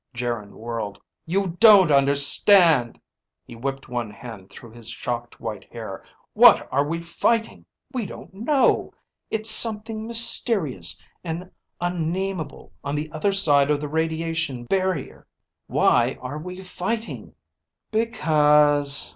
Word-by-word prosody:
Geryn 115 -4 -5
whirled. 115 -3 -7 0.3
"You 185 0 -2
don't 205 -7 +6
understand!" 140 - +3 0.5
He - - -13
whipped 135 +3 -6
one 120 -2 -5
hand 105 -3 -12
through 120 - -14
his 115 -1 -9
shocked 120 0 -6
white 105 -4 -8
hair. 110 -5 -9 0.3
"What - - +5
are 140 +2 +2
we 165 +2 -4
fighting? 225 +7 -2 0.3
We 240 -6 -4
don't - - -12
know. 260 +7 0 0.3
It's 220 0 +3
something 220 0 +5
mysterious 200 - +3 0.2
and 175 +2 -7 0.3
unnamable 175 -1 -5
on 140 +1 -4
the 155 +1 -5
other 170 +6 -1
side 145 -8 +3
of 150 -1 0
the 150 - -5
radiation 160 -4 -3
barrier. 185 +1 -3 0.4
Why 120 +2 +1
are 130 +4 -7
we 180 +3 -9
fighting?" 205 +5 -6 0.6
"Because 150 -9 +2
155 Hz, 120 wpm, -22 LUFS, 125-190 Hz, 0.6 s, don't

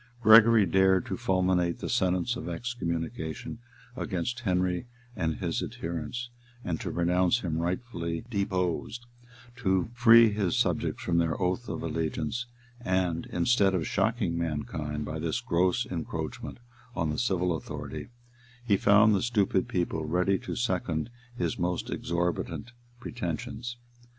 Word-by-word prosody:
Gregory 110 -1 +7
dared 95 0 +3
to - - -3
fulminate 95 -5 +1
the - - -5
sentence 95 +6 +1
of - - -5
excommunication 85 -2 -4 0.4
against 110 +2 -2
Henry 90 -1 0 0.3
and 80 -3 -1
his - - -2
adherents, 85 +9 -5 0.5
to - - -4
pronounce 90 +6 +2
him 80 -4 -2
rightfully 85 -1 -3
deposed, 100 +1 -2 0.5
to 95 -3 +1
free 115 -2 +7
his 100 -5 0
subjects - - 0
from 85 -1 +2
their 85 -1 0
oath 95 +6 -1
of - - -4
allegiance; 80 +8 -2 0.4
and, 90 -4 0
instead 95 +1 +2
of 85 - -1
shocking 100 -3 0
mankind 75 -2 -3
by 80 - -4
this 80 -1 -1
gross 90 +1 +1
encroachment - - -5 0.4
on 80 -6 0
the 75 - -2
civil 90 -7 +1
authority, - - -6 0.6
he 100 -4 +3
found 105 +2 +5
the 100 - +2
stupid 105 -5 +1
people 85 -3 -1
ready 90 +5 +1
to 125 - -5
second 95 -4 -1 0.3
his 120 - -1
most 90 0 -1
exorbitant 85 +7 -2 0.3
pretensions. 115 +2 -5
90 Hz, 130 wpm, -28 LUFS, 85-115 Hz, 0.6 s, Gregory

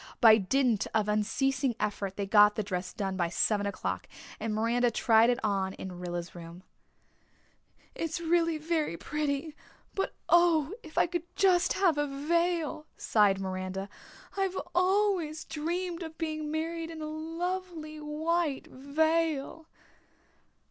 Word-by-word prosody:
By 225 -2 +8
dint 235 +1 +1
of 215 -2 +2
unceasing 250 +5 +1
effort 200 -2 -2
they 200 - -2
got 210 +1 +6
the 215 - -1
dress 185 -2 -3
done 195 -2 -3
by 175 -2 0
seven 205 +3 +1
o'clock 200 - -3 0.3
and 225 0 -2
Miranda 230 +3 +2
tried 225 0 +4
it 245 - +2
on 195 -2 0
in 180 -2 -7
Rilla's 175 -1 -5
room. 170 +1 -10 1.3
"It's 330 -1 -3
very 330 - 0
pretty 300 - -2 0.4
but 390 - -2
oh, 340 -2 +4
if 315 - -13
I - - +5
could 345 0 -4
just 375 -1 +4
have 350 -6 +2
a 290 - +1
veil," 315 +2 0
sighed 205 -3 +3
Miranda. 190 +1 -4 0.5
"I've 385 -1 -1 0.2
always 365 -4 +1
dreamed 340 +3 -3
of 320 -1 -7
being 310 -2 -3
married 325 +1 -3
in 320 -1 -7
a - - -3
lovely 325 0 -4
white 305 0 -1
veil." 315 +2 0
300 Hz, 135 wpm, -30 LUFS, 210-330 Hz, 1.3 s, By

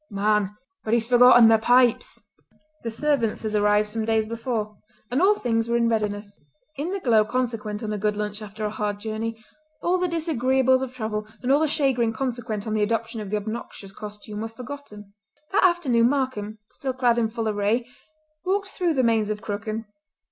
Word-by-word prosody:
"Man! 210 -1 +1 0.3
but 220 +1 +1
he's 230 -1 +1
forgotten 245 -1 +7
the 225 0 +5
pipes!" 245 +1 +2 0.6
The 230 - -3
servants 230 -2 0
had 215 -1 -3
arrived 210 0 +3
some 220 +1 -2
days 220 0 +1
before, 225 -2 -3 0.4
and 260 +5 +1
all 405 +3 +5
things 230 - -1
were 235 - +2
in 235 -1 +2
readiness. 205 -2 -2 0.4
In 295 +5 -3
the 395 - -2
glow 230 - +4
consequent 225 -3 -3
on 215 -1 -2
a 210 - -3
good 210 +1 0
lunch 210 0 -3
after 215 +1 -6
a 210 - -2
hard 210 -1 -3
journey 225 +1 -4 0.5
all 365 +1 +2
the 360 - +1
disagreeables 265 -6 +2
of 265 -2 -3
travel 215 -4 -4 0.2
and 250 - +1
all 280 - +5
the 315 - +2
chagrin 260 -6 +1
consequent 235 -4 -3
on 220 - -2
the 215 - +1
adoption 225 +1 -1
of 205 - -6
the 210 - 0
obnoxious 210 -2 -6
costume 210 +1 -8
were 225 - -3
forgotten. 225 -4 -10 0.4
That 400 - +3
afternoon 275 -11 +3
Markam, 255 -6 -2
still 265 -1 -4
clad 245 -2 +2
in 225 - +2
full 225 0 -3
array, 215 +3 0 0.6
walked 395 +1 0
through 350 -4 -1
the 260 - +2
Mains 225 -3 +2
of 210 0 -3
Crooken. 215 +1 -4
225 Hz, 190 wpm, -24 LUFS, 210-255 Hz, 0.6 s, forgotten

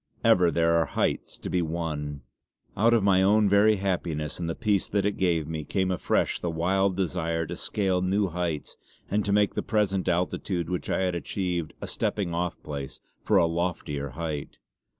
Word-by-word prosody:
Ever 90 -1 +5
there 85 0 +2
are 80 - -1
heights - - 0
to - - -7
be 90 - +1
won. 75 -4 -3 0.5
Out 115 +4 +4
of 115 -3 +3
my 95 -2 +4
own 105 +2 +4
very 100 +2 +5
happiness 85 -6 -2
and 85 -1 -2
the 80 - -2
peace 105 -3 0
that 100 -1 +1
it 105 - +1
gave 85 -5 +1
me, 80 -1 -4
came 95 +5 0
afresh 90 - 0
the 85 - -2
wild 95 +3 +1
desire 85 -3 -1
to 85 +3 -5
scale 95 -1 0
new 95 +2 +1
heights 85 -3 -3 0.3
and 105 +1 +2
to 100 - -1
make 105 0 +3
the - - -1
present 100 -4 0
altitude 90 0 -1
which 90 - -3
I - - +1
had 90 -1 0
achieved 85 -1 -2
a - - -3
stepping 95 -5 -2
off 85 0 -2
place 70 -2 -6 0.2
for - - +3
a - - +5
loftier 80 -4 -2
height. 80 -4 -4
90 Hz, 190 wpm, -27 LUFS, 80-95 Hz, 0.5 s, Ever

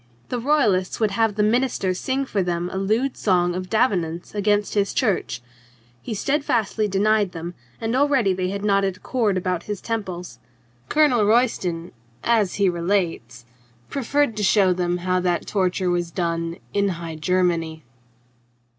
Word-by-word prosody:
The 250 - -2
Royalists 230 -9 +2
would 215 -3 +2
have 220 0 +1
the 210 - +2
minister 225 -4 +1
sing 265 +8 -2
for 205 -6 -1
them 175 0 -2
a - - -3
lewd 220 +7 0
song 175 -3 +2
of 185 +1 -5
Davenant's 180 -8 0
against 205 0 +1
his 200 -1 0
church. 200 - 0 0.6
He 225 - -5
steadfastly 230 -4 0
denied 205 0 +2
them, 170 +1 -6 0.3
and 225 +2 -1
already 265 -8 +3
they 185 0 -2
had 200 +1 -4
a - - -2
knotted 195 -2 +1
cord 220 -7 0
about 180 -1 -2
his 205 -2 -2
temples. 190 -6 -5 0.5
Colonel 290 -8 +4
Royston, 190 -8 +1 0.3
as 220 -5 +2
he 200 -1 +2
relates, 170 - -1 0.5
proffered 280 -2 +1
to - - -1
show 190 -2 +4
them 175 0 -1
how 185 0 +2
that 180 -1 0
torture 185 -2 0
was 175 -1 -1
done 170 -1 -2 0.2
in 200 0 +2
High 165 -1 -6
Germany. 165 -2 0
195 Hz, 155 wpm, -23 LUFS, 175-225 Hz, 0.6 s, Colonel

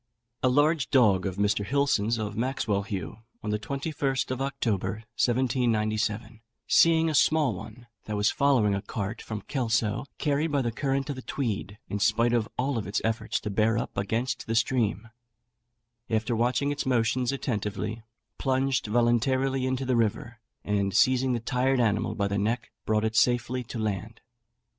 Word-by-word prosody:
A 130 - +3
large 145 +2 +2
dog 105 -8 +4
of 95 - -4
Mr. 100 0 +1
Hilson's, 115 -3 +1
of 105 -2 -3
Maxwelhaugh, 105 -7 -2 0.2
on 105 - -2
the 105 - 0
21st 140 +2 -2
of 130 +1 -3
October, 110 -5 -2 0.2
1797, 115 -3 0 0.2
seeing 165 -1 +5
a 160 - 0
small 150 -4 +3
one 110 +6 -10 0.2
that 105 - -3
was 105 +1 +2
following 130 -8 +3
a 100 - -1
cart 105 +1 -4
from 105 -3 -6
Kelso 115 -4 0
carried 150 +1 0
by 140 -2 +1
the 120 - -1
current 135 +3 -1
of 135 - -6
the - - -6
Tweed, 105 -7 -3
in 105 - -3
spite 115 +3 +2
of 115 -2 +1
all 130 -1 0
its 100 -1 -2
efforts 115 0 -1
to 105 - -4
bear 110 +2 +2
up - - -4
against 110 +6 -2
the 115 - -1
stream, 115 -3 +1 1.0
after 110 +2 0
watching 125 +5 +1
its 145 - -3
motions 125 0 +1
attentively, 110 -4 -3 0.4
plunged 135 -2 +1
voluntarily 130 +4 +2
into 130 +1 -1
the 130 -1 +1
river, 115 0 -1 0.2
and 100 -2 0
seizing 130 +2 +3
the 120 - 0
tired 125 +2 +1
animal 110 -3 +1
by 100 -2 0
the 100 0 -1
neck, 110 +3 -1 0.2
brought 110 0 +2
it 110 0 -2
safely 120 +1 +2
to 120 - -7
land. 110 +1 -3
115 Hz, 160 wpm, -27 LUFS, 105-130 Hz, 1.0 s, seeing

